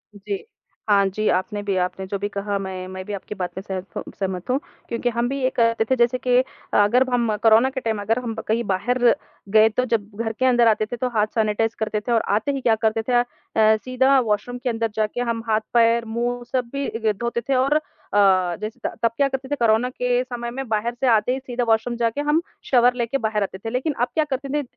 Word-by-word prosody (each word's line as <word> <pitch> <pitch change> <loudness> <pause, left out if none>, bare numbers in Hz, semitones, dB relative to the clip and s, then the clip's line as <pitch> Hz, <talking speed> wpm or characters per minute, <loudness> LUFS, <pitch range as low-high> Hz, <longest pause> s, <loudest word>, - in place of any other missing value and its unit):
जी। 205 - -5 0.4
हाँ 200 -1 +5
जी, 215 +3 -2
आपने 190 +3 0
भी, 200 -1 -1
आपने 190 +1 -4
जो 200 - -2
भी 205 - -1
कहा 200 0 -2
मैं 185 -1 -5
मैं 185 0 -7
भी 210 - -5
आपकी 200 +1 -6
बात 180 -2 -4
से - - -6
सहम 190 -1 -6
सहमत 190 +1 -3
हूँ 260 +2 +2 0.3
क्योंकि 235 +1 -1
हम 235 +1 -1
भी 275 +1 -3
ये 255 - +2
करते 230 -1 +3
थे - - +5
जैसे 240 0 +2
कि 250 0 +2 0.4
अगर 235 +6 +4
हम 235 -3 +1
कोरोना 225 +3 +6
के 265 0 -5
टाइम 220 -3 -2
अगर 225 +4 +1
हम 230 - -3
कहीं 230 +2 +1
बाहर 245 +7 -1 0.5
गए 220 +1 +6
तो 250 +4 0
जब 215 -4 -1
घर 225 - -2
के 260 - +2
अंदर 240 -2 +4
आते 215 -1 +3
थे 245 - -5
तो 250 +1 -1
हाथ 210 0 +3
सैनिटाइज़ 220 +1 +1
करते 215 -1 -1
थे 240 - -4
और 230 - +3
आते 220 +7 0
ही 275 -1 -3
क्या 230 -2 +3
करते 220 +1 +2
थे - - +2 0.6
अ, - - +3
सीधा 260 +2 +3
वॉशरूम 235 +1 -1
के 250 +1 -2
अंदर 225 -1 -1
जाके 215 +3 -1
हम 230 -1 -2
हाथ, 215 0 +3
पैर, 230 0 +4
मुँह 240 +2 -2
सब 250 -2 -1
भी 225 -6 -1
धोते 235 +3 -3
थे 270 +4 -2
और 265 +3 +2 0.4
अ, 190 -3 +4
जैसे 215 +4 -5
त - - 0
तब 230 - +4
क्या 280 - +3
करते 265 -1 -4
थे 290 - 0
कोरोना 235 -1 +2
के 250 0 0
समय 240 -1 -5
में 270 +1 -5
बाहर 220 +2 0
से 265 - +1
आते 225 0 +3
ही 265 - -2
सीधा 250 -2 -3
वॉशरूम 225 +2 +1
जाके 235 +4 0
हम 295 +2 +2 0.2
शावर 245 -1 +4
लेके 240 +2 -1
बाहर 215 -3 0
आते 190 -1 -5
थे। 225 +4 -6
लेकिन 255 +6 -1
अब 245 - +3
क्या 315 - +2
करते 275 -1 -4
न - - -6
230 Hz, 235 wpm, -22 LUFS, 210-250 Hz, 0.6 s, कोरोना